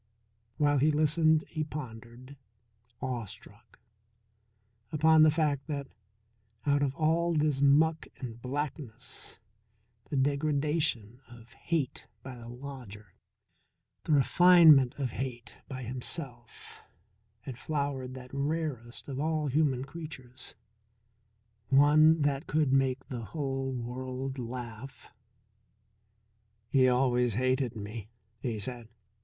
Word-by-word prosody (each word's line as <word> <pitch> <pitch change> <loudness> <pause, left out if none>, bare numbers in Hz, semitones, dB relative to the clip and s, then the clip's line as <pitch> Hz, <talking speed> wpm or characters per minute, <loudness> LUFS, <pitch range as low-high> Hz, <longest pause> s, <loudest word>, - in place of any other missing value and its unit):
While 145 -2 +3
he 150 +4 +4
listened 155 +1 +3
he 155 -2 -3
pondered, 125 -2 -9 0.7
awestruck, 120 -5 -7 1.1
upon 160 +1 +5
the 155 - +8
fact 150 -3 0
that 140 -3 -4 0.8
out 145 0 +2
of 140 -1 0
all 165 +2 +1
this 150 -3 +1
muck 155 +3 +4
and 120 -2 -7
blackness, 135 -2 -6 0.7
the 145 - -2
degradation 140 -4 0
of 120 -1 -15
hate 155 +2 -3 0.2
by 130 -1 -8
the 115 -1 -10
lodger, 120 -7 -10 0.9
the 155 - +1
refinement 155 -3 +6
of 135 -4 -3
hate 125 -1 -6
by 130 -1 -6
himself, 125 0 -7 0.6
had 125 0 -8
flowered 140 -4 -3
that 125 0 -11
rarest 140 -5 -3
of 135 -2 -5
all 155 -1 0
human 135 -2 +1
creatures 140 -5 -9 1.1
one 150 +3 +6
that 140 +2 0
could 150 -3 +1
make 135 -1 +1
the 120 -3 -6
whole 135 +3 -3
world 130 +2 -5
laugh. 120 +1 -8 1.6
"He 130 -2 +4
always 125 -3 +2
hated 130 0 0
me," 105 0 -7 0.3
he 115 -3 -3
said. 115 +2 -7
135 Hz, 105 wpm, -30 LUFS, 125-150 Hz, 1.6 s, the